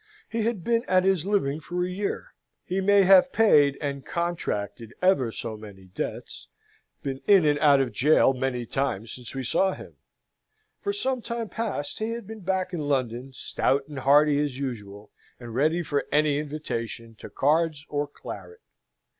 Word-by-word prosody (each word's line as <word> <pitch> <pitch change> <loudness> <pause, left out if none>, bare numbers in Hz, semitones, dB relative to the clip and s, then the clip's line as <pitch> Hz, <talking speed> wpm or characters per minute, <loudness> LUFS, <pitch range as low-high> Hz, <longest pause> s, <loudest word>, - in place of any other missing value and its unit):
He 230 - -2
had 215 -5 -1
been 235 +2 +1
at 185 0 +4
his 190 -2 +1
living 155 -8 +1
for 180 +2 -2
a - - -3
year. 200 - -4 0.3
He 190 +2 -1
may 200 +1 +5
have 190 0 +6
paid 145 -11 +4
and 140 -2 -4
contracted 120 - -3
ever 180 -11 +3
so 110 0 -5
many 100 -3 -12
debts, 90 - -6 0.5
have - - -43
been 135 -1 -4
in 195 -5 +6
and 145 -1 +3
out 145 -2 +5
of 130 -3 0
jail 135 +4 +4
many 130 -2 -2
times 115 -5 -2
since 125 0 -9
we 135 - -3
saw 190 +9 +2
him. - - -12 0.8
For 405 - -2
some 265 -12 -1
time 230 -1 -4
past 215 -10 -4
he 220 +1 -1
had 235 -2 -6
been 220 +2 -8
back 185 0 -1
in 170 - -2
London 130 -3 -1
stout 135 +1 -1
and 145 -3 -7
hearty 145 +2 +4
as 145 -3 -1
usual, 105 -7 -6 0.3
and 120 -2 -9
ready 155 +7 +1
for 145 -2 -1
any 150 -1 +3
invitation 115 -6 -5
to - - -9
cards 155 +1 +1
or 145 0 -2
claret. 450 - -10
150 Hz, 175 wpm, -26 LUFS, 130-190 Hz, 0.8 s, have